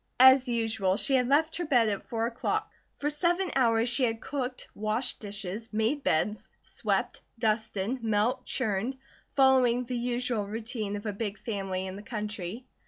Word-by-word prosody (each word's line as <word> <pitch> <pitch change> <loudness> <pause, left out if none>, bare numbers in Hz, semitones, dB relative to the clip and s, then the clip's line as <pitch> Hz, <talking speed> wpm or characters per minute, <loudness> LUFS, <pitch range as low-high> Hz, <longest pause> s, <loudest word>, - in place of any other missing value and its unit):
As 260 0 +8
usual, 220 -5 +1
she 275 - +1
had 250 -2 +3
left 315 +4 +3
her 350 - -2
bed 245 -7 +4
at 200 -2 -2
four 225 -1 -1
o'clock; 255 - -2 0.3
for 295 +1 -1
seven 350 +5 +1
hours 230 -3 +3
she 245 +2 +1
had 225 -2 +1
cooked, 260 -2 -4
washed 215 +4 -1
dishes, 205 +1 -5
made 225 +7 0
beds, 210 +4 0
swept, - - -2 0.2
dusted, 220 +1 -1
milked, 220 +2 +1
churned, 235 +2 -1 0.3
following 255 -3 +4
the 250 +1 -3
usual 240 -3 -1
routine 220 -1 -4
of 205 +1 -6
a 210 - -2
big 205 0 -3
family 195 -4 -3
in 190 0 -6
the - - -8
country. 210 -1 -5
230 Hz, 165 wpm, -29 LUFS, 210-255 Hz, 0.3 s, As